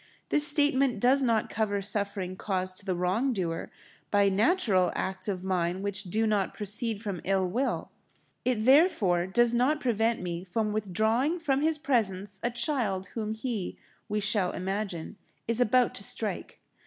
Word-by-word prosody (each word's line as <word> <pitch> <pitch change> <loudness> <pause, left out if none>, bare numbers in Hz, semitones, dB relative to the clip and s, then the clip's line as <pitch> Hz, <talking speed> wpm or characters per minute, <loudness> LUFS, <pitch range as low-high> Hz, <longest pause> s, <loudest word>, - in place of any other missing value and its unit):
This 295 0 +6
statement 275 -5 +2
does 260 +5 +4
not 230 -4 +1
cover 205 -2 0
suffering 200 -2 -2
caused 185 -1 -3
to 200 - -7
the 185 - 0
wrong 190 +10 0
doer 170 -5 -3 0.4
by 200 -1 +3
natural 205 - +2
acts 190 +2 -3
of 185 -3 -3
mine 185 0 -1
which 200 0 -3
do 215 +5 0
not 210 -3 0
proceed 210 +1 0
from 195 -6 -4
ill 190 0 +1
will. 245 +9 -2 0.5
It, 240 -4 0
therefore, 225 - +4
does 240 +4 +2
not 260 +6 +2
prevent 230 -3 +1
me 175 -1 -4
from 210 +3 -2
withdrawing 220 - 0
from 285 -5 0
his 315 0 +1
presence 205 -8 -1
a 240 - 0
child 235 -7 -1
whom 220 -1 -3
he, 220 -4 -4 0.3
we 210 0 0
shall 200 -3 +1
imagine, 195 -1 -4 0.3
is 230 +1 +1
about 245 +2 +3
to - - -4
strike. - - -3
210 Hz, 160 wpm, -28 LUFS, 190-245 Hz, 0.5 s, This